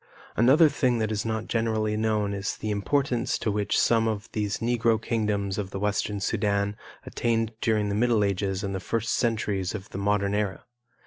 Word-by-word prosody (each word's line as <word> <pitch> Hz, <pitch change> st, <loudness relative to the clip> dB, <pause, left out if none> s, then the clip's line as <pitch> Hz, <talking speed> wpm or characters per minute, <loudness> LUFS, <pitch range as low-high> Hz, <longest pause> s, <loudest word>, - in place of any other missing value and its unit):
Another 135 Hz, +8 st, +6 dB
thing 130 Hz, -4 st, +1 dB
that 110 Hz, -1 st, -1 dB
is 105 Hz, 0 st, -2 dB
not 110 Hz, -1 st, -2 dB
generally 110 Hz, -2 st, 0 dB
known 105 Hz, -2 st, 0 dB
is 100 Hz, 0 st, -3 dB
the 110 Hz, -, -3 dB
importance 125 Hz, +3 st, 0 dB
to 110 Hz, -, -1 dB
which 105 Hz, 0 st, 0 dB
some 115 Hz, -1 st, +3 dB
of 110 Hz, 0 st, -3 dB
these 105 Hz, -2 st, -1 dB
Negro 115 Hz, -1 st, +1 dB
kingdoms 105 Hz, -3 st, -1 dB
of 100 Hz, -2 st, -3 dB
the 100 Hz, -, -5 dB
Western 105 Hz, 0 st, -1 dB
Sudan 100 Hz, 0 st, 0 dB, 0.3 s
attained 115 Hz, -1 st, 0 dB
during 105 Hz, -2 st, +1 dB
the -, -, -1 dB
middle 115 Hz, 0 st, +2 dB
ages 100 Hz, 0 st, -1 dB
and 100 Hz, -1 st, -2 dB
the 95 Hz, -, -2 dB
first 115 Hz, +5 st, -1 dB
centuries 105 Hz, -5 st, 0 dB
of 95 Hz, -2 st, -7 dB
the 95 Hz, -, -5 dB
modern 100 Hz, 0 st, +1 dB
era. 105 Hz, -2 st, -1 dB
105 Hz, 185 wpm, -26 LUFS, 100-115 Hz, 0.3 s, Another